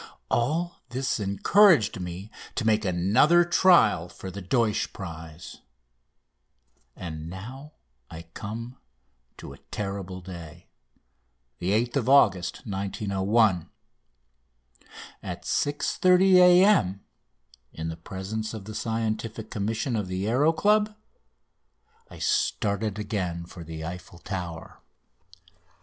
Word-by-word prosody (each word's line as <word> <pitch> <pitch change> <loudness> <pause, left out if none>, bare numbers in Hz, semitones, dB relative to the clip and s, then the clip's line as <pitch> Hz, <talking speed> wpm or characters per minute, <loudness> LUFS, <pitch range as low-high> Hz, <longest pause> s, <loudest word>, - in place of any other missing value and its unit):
All 160 +9 0
this 130 0 -2
encouraged 120 - +4
me 90 +4 -7 0.2
to 120 - -2
make 110 -1 +3
another 105 - +4
trial 170 - +4
for 95 - -8
the 100 +2 -7
Deutsch 110 +3 0
prize. 80 -2 -9 1.3
And 80 -3 -7
now 130 - -9 0.4
I 80 0 -9
come 115 +4 -7 0.6
to - - -9
a - - -15
terrible 95 -2 -5
day 85 -2 -10 1.0
8th 115 +7 0
August 115 -10 +3
1901. 100 -1 0 1.5
At - - -6
6.30 180 +6 +2
A.M., 180 - +5 0.7
in 80 0 -5
presence 100 +6 -5
of 100 -3 -8
the 110 - -7
Scientific 110 0 -3
Commission 110 +4 -2
of 105 -4 -2
the 95 +1 -3
Aéro 130 +8 +3
Club, 210 +2 +3 1.1
I - - -12
started 100 0 0
again 95 -5 -3
for 85 0 -10
the 80 0 -7
Eiffel 90 +1 -8
Tower. 90 -3 -7
105 Hz, 100 wpm, -26 LUFS, 90-125 Hz, 1.5 s, A.M